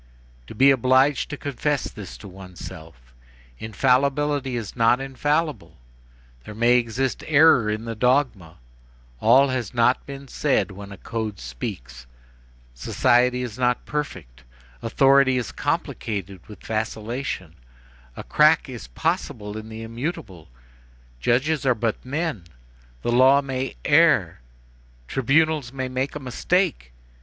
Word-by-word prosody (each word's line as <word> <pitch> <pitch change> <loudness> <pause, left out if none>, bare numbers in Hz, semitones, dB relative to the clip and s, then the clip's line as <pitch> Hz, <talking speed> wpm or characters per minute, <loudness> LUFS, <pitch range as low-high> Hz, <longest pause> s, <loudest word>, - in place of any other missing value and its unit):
To - - -10
be 135 +1 +6
obliged 130 +2 +3
to 150 - -5
confess 145 +1 -2
this 100 -6 -8
to 100 - -11
oneself: 90 -8 -12 0.5
infallibility 135 +4 +1
is 115 -5 -5
not 115 +2 +3
infallible, 145 0 -2 0.7
there 105 - -10
may 120 +2 +4
exist 125 +3 -2
error 150 -7 +5
in 110 +2 -3
the 115 - -4
dogma, 115 - 0 0.6
all 130 - +5
has 125 -4 -3
not 120 +1 +3
been 140 0 -8
said 135 -4 0
when 100 +1 -10
a 100 - -9
code 110 -3 -5
speaks, - - -7 0.7
society 125 - +2
is 120 -1 -7
not 125 -1 +1
perfect, 90 - -5 0.4
authority 135 +2 +4
is 120 -4 -3
complicated 100 -4 -4
with 105 - -13
vacillation, 110 - -4 0.6
a - - -6
crack 155 +1 +4
is 120 - -8
possible 105 - -3
in 110 0 -7
the 110 0 -8
immutable, 115 - -6 0.7
judges 135 - +1
are 130 -2 +3
but 110 0 -2
men, 145 - -3 0.6
the - - 0
law 130 +3 +6
may 135 - -4
err, - - +3 0.7
tribunals 145 0 +1
may 130 -1 -4
make 130 +3 -3
a - - -4
mistake! 140 - -1
125 Hz, 125 wpm, -23 LUFS, 105-135 Hz, 0.7 s, be